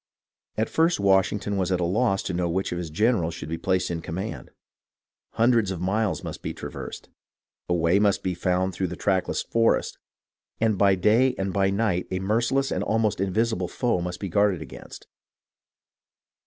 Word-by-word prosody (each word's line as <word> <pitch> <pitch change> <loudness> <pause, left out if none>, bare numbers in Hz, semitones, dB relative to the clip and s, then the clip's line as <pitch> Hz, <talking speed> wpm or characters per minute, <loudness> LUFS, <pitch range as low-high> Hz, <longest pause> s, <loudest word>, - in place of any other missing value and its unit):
At 110 - +1
first 165 -2 +2
Washington 100 +1 +2
was 95 -1 0
at 90 - +1
a 85 - +1
loss 95 +2 +1
to 90 - -3
know 85 0 0
which 95 +3 -1
of 90 - -2
his 85 -2 -5
generals 85 -1 +1
should 85 - -7
be 80 +1 -3
placed 95 -1 0
in 85 -1 -3
command. 95 +7 -5 0.8
Hundreds 115 -3 +3
of 95 -3 -4
miles 100 +3 0
must - - -6
be - - -5
traversed, - - -8 0.6
a 90 - +2
way 85 +3 +3
must 100 -1 +2
be 95 - -1
found 90 +2 0
through 95 +1 -1
a 90 - -5
trackless 95 +1 0
forest, 115 0 +1 0.6
and 110 -1 +2
by 100 0 +4
day 115 +7 +3
and 95 -1 -2
by 95 +1 +2
night 100 -3 0
a 95 - -2
merci 110 +7 0
less 135 0 +1
and - - -1
almost 110 -3 0
invisible 100 -1 0
foe 120 -5 0
must 90 0 -4
be 100 - -4
guarded 100 0 +2
against. 65 - -11
95 Hz, 180 wpm, -25 LUFS, 90-110 Hz, 0.8 s, by